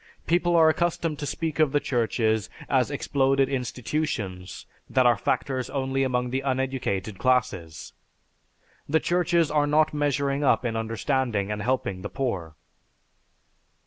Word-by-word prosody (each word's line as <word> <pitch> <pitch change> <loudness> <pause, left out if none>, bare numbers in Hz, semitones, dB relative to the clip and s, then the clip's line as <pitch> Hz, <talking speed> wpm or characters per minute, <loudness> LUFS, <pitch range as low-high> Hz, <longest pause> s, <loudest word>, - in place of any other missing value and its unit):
People 175 0 +2
are 160 -1 +6
accustomed 165 -1 0
to 145 - -4
speak 160 0 -3
of 150 -3 +3
the 145 - +4
churches 110 -4 0 0.2
as - - +2
exploded 135 0 +1
institutions 125 -7 -3 0.2
that 130 -1 +3
are 120 -1 +6
factors 130 +4 -1
only 135 -1 -1
among 125 -2 0
the 130 +1 -1
uneducated 130 -7 -2
classes. 95 -11 -1 1.0
The 160 +2 +3
churches 170 -2 +1
are 150 -1 +2
not 155 +1 +3
measuring 145 -1 0
up 135 - +3
in 115 -1 -1
understanding 115 -1 -1
and 105 0 -3
helping 105 -5 -1
the - - -5
poor." 95 - -3
130 Hz, 135 wpm, -26 LUFS, 115-145 Hz, 1.0 s, are